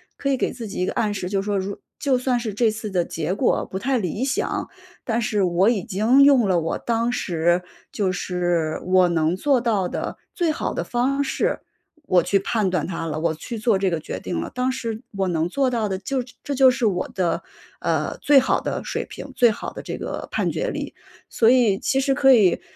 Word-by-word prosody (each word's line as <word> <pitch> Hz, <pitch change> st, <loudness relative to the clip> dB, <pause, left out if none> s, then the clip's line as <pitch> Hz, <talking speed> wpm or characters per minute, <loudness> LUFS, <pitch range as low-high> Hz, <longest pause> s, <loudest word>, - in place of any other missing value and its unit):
可 275 Hz, -, -2 dB
以 270 Hz, -, +2 dB
给 -, -, -1 dB
自 235 Hz, -3 st, -7 dB
己 -, -, -5 dB
一 180 Hz, -, +1 dB
个 -, -, -2 dB
暗 210 Hz, -2 st, 0 dB
示， 190 Hz, -3 st, -4 dB
就 195 Hz, 0 st, 0 dB
说 205 Hz, 0 st, -1 dB
如 195 Hz, +1 st, -4 dB, 0.2 s
就 275 Hz, -3 st, +2 dB
算 250 Hz, -1 st, 0 dB
是 225 Hz, -3 st, -4 dB
这 220 Hz, +2 st, +2 dB
次 215 Hz, 0 st, -5 dB
的 180 Hz, -3 st, +1 dB
结 165 Hz, +1 st, -3 dB
果 245 Hz, -, +1 dB
不 190 Hz, -, -6 dB
太 265 Hz, +5 st, 0 dB
理 210 Hz, +2 st, -2 dB
想， 265 Hz, 0 st, -1 dB, 0.3 s
但 230 Hz, 0 st, -1 dB
是 210 Hz, -2 st, 0 dB
我 180 Hz, +3 st, +3 dB
已 215 Hz, -6 st, 0 dB
经 220 Hz, +8 st, +4 dB
用 270 Hz, -6 st, +5 dB
了 185 Hz, -2 st, +3 dB
我 165 Hz, -, -2 dB
当 230 Hz, 0 st, 0 dB
时， 175 Hz, -5 st, +1 dB, 0.3 s
就 195 Hz, -4 st, 0 dB
是 175 Hz, -3 st, -1 dB
我 185 Hz, -1 st, +4 dB
能 165 Hz, 0 st, +1 dB
做 270 Hz, +6 st, +2 dB
到 215 Hz, -6 st, 0 dB
的 -, -, -4 dB, 0.2 s
最 345 Hz, -4 st, 0 dB
好 -, -, -3 dB
的 -, -, -2 dB
方 260 Hz, +4 st, 0 dB
式， 275 Hz, -, 0 dB, 0.5 s
我 180 Hz, -8 st, +3 dB
去 195 Hz, -, +2 dB
判 210 Hz, 0 st, 0 dB
断 180 Hz, -4 st, -1 dB
它 165 Hz, -2 st, -4 dB
了。 155 Hz, -1 st, -3 dB
我 165 Hz, 0 st, 0 dB
去 225 Hz, +9 st, -7 dB
做 220 Hz, -2 st, +2 dB
这 190 Hz, 0 st, +1 dB
个 165 Hz, -2 st, -1 dB
决 155 Hz, -, -6 dB
定 175 Hz, -, -3 dB
了， -, -, -4 dB
当 250 Hz, +1 st, 0 dB
时 230 Hz, -4 st, -4 dB, 0.2 s
我 195 Hz, -1 st, +1 dB
能 165 Hz, -2 st, 0 dB
做 270 Hz, +6 st, +1 dB
到 230 Hz, -4 st, -1 dB
的 190 Hz, -, -1 dB
就 255 Hz, +8 st, -2 dB
是 245 Hz, -, -10 dB, 0.2 s
这 285 Hz, -, -3 dB
就 260 Hz, -1 st, +6 dB
是 245 Hz, -, -1 dB
我 185 Hz, -4 st, 0 dB
的， 180 Hz, -3 st, -1 dB, 0.4 s
呃， -, -, -1 dB
最 290 Hz, -2 st, +6 dB
好 265 Hz, -, +1 dB
的 -, -, -3 dB
水 -, -, -3 dB
平， -, -, -9 dB
最 240 Hz, -2 st, +5 dB
好 225 Hz, -, -6 dB
的 -, -, -7 dB
这 -, -, -5 dB
个 -, -, -5 dB
判 -, -, 0 dB
决 -, -, -2 dB
力。 -, -, -5 dB, 0.4 s
所 225 Hz, -, +3 dB
以 235 Hz, -6 st, +4 dB
其 270 Hz, -, +1 dB
实 270 Hz, 0 st, +1 dB
可 270 Hz, 0 st, +6 dB
以 200 Hz, -7 st, +4 dB
210 Hz, 250 characters per minute, -23 LUFS, 180-250 Hz, 0.5 s, 就